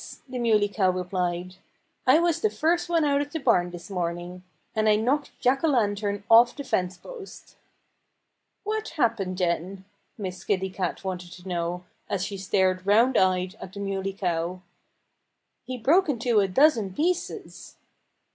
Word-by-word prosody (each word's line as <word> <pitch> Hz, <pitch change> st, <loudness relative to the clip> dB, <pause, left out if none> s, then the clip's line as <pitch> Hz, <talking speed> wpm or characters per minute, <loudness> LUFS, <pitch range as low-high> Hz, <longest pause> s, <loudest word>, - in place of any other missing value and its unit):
the 255 Hz, -1 st, -5 dB
Muley 215 Hz, -3 st, +3 dB
Cow 200 Hz, -2 st, +1 dB
replied. 180 Hz, 0 st, -2 dB, 0.5 s
"I 260 Hz, +4 st, +7 dB
was 340 Hz, -1 st, +1 dB
the 435 Hz, -, +3 dB
first 345 Hz, 0 st, 0 dB
one 330 Hz, -3 st, +2 dB
out 285 Hz, -1 st, +2 dB
of 290 Hz, 0 st, -5 dB
the 320 Hz, -, -3 dB
barn 205 Hz, -10 st, +2 dB
this 175 Hz, -1 st, -9 dB
morning. 175 Hz, 0 st, -4 dB, 0.3 s
And 215 Hz, 0 st, +2 dB
I 210 Hz, -, +5 dB
knocked 265 Hz, +7 st, -1 dB
Jack 265 Hz, +3 st, +2 dB
O'Lantern 205 Hz, -8 st, +1 dB
off 235 Hz, +1 st, +6 dB
the 285 Hz, -, -6 dB
fence 180 Hz, -8 st, -1 dB
post." 455 Hz, -, -11 dB, 1.1 s
"What 435 Hz, +1 st, -2 dB
happened 225 Hz, -8 st, 0 dB
then?" 185 Hz, +2 st, -2 dB, 0.3 s
Miss 185 Hz, -4 st, -6 dB
Kitty 190 Hz, -2 st, -1 dB
Cat 185 Hz, -1 st, -3 dB
wanted 180 Hz, -2 st, -5 dB
to 180 Hz, +1 st, -12 dB
know, 175 Hz, 0 st, -2 dB, 0.3 s
as 195 Hz, -1 st, -1 dB
she 200 Hz, -1 st, -5 dB
stared 185 Hz, -1 st, +1 dB
round 230 Hz, +5 st, +4 dB
eyed 185 Hz, 0 st, +2 dB
at 185 Hz, -, -9 dB
the 200 Hz, -, -8 dB
Muley 195 Hz, -1 st, -2 dB
Cow. 180 Hz, -1 st, -2 dB, 1.0 s
"He 255 Hz, +1 st, -5 dB
broke 315 Hz, +10 st, +3 dB
into 240 Hz, -4 st, +2 dB
a 195 Hz, -, +3 dB
dozen 215 Hz, -3 st, +3 dB
pieces." 350 Hz, +3 st, -3 dB
200 Hz, 155 wpm, -26 LUFS, 185-260 Hz, 1.1 s, I